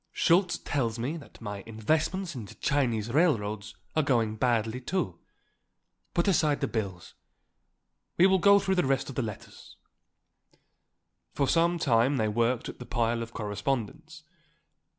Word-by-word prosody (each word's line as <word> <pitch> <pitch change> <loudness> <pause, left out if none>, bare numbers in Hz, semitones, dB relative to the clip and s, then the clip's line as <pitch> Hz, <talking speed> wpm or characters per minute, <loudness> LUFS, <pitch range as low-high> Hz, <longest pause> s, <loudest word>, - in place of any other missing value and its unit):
Schultz 175 +1 +3
tells 120 -6 -2
me 125 +7 -2
that 150 - -14
my 105 -2 -5
investments 155 - -1
in 120 -6 -6
the - - -13
Chinese 120 -6 0
railroads 110 - +1 0.2
are 155 - +4
going 115 -7 +1
badly, 115 +1 0
too. 130 - -2 1.0
Put 170 - +2
aside 155 -6 +2
the 140 - 0
bills. 95 -7 -4 1.0
We 175 - +6
will 190 0 +4
go 200 +3 +6
through 190 -1 +1
the - - -3
rest 135 0 0
of 135 - -7
the - - 0
letters." 110 -4 -8 1.6
For 140 - +1
some 170 +2 +3
time 130 -2 +2
they 110 -3 +1
worked 115 +3 0
at - - -8
the 125 - -8
pile 115 -1 0
of 115 0 -6
correspondence. 135 +9 -3
125 Hz, 150 wpm, -28 LUFS, 110-155 Hz, 1.6 s, We